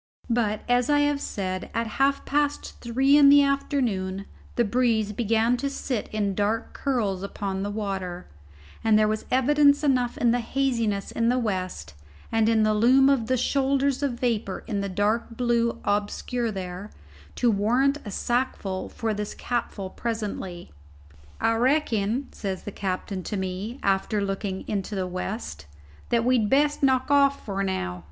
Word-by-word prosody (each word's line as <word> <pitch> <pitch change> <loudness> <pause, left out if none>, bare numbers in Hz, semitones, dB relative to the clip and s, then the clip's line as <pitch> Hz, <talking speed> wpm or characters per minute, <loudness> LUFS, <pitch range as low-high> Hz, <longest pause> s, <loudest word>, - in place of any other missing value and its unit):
But, 215 -3 +1
as 245 +1 +2
I 290 0 +4
have 290 -1 +1
said, 185 -6 -4
at 230 0 0 0.2
half 275 0 +2
past 290 0 -1
three 265 +4 +3
in 285 -1 +8
the 285 0 +7
afternoon, 230 -9 -1 0.3
the 240 - +3
breeze 225 -2 +1
began 230 +2 +2
to 280 +2 -2
sit 255 -4 -3
in 205 -2 -1
dark 210 +3 -1
curls 220 -9 -1
upon 195 -1 -4
the 200 - -2
water, 195 -4 -4 0.6
and 220 -1 +4
there 215 0 +4
was 215 0 -2
evidence 285 +3 +4
enough 250 -4 +1
in 235 - +3
the 245 - +2
haziness 230 -5 -1
in 230 0 +1
the 250 - +2
west, 185 - -3 0.4
and 225 -1 +3
in 220 -1 +3
the 215 0 +3
loom 260 +6 +5
of 240 -5 +1
the 255 - +2
shoulders 275 +1 +1
of 280 -3 0
vapour 230 -5 -2
in 205 -3 -2
the 200 - -3
dark 215 +4 -1
blue 235 -1 +1
obscure 210 +4 -1
there, 185 +1 -6 0.5
to 240 -2 +2
warrant 245 +8 +2
a 210 - -7
sackful 210 -4 -2
for 225 -1 -2
this 210 0 -4
capful 205 -5 -3
presently. 210 -6 -5 0.7
"I 225 - +2
reckon," 245 -2 +1
says 190 -3 -5
the 205 - -6
captain 190 0 -3
to 210 - -3
me, 190 +7 -4
after 195 +2 +1
looking 195 -1 -3
into 205 0 -3
the 190 -1 -1
west, 180 - -5 0.4
"that 235 -1 +2
we'd 245 -4 +3
best 290 +3 +2
knock 260 0 +2
off 280 -2 +3
now. 190 - -2
225 Hz, 160 wpm, -25 LUFS, 200-255 Hz, 0.7 s, in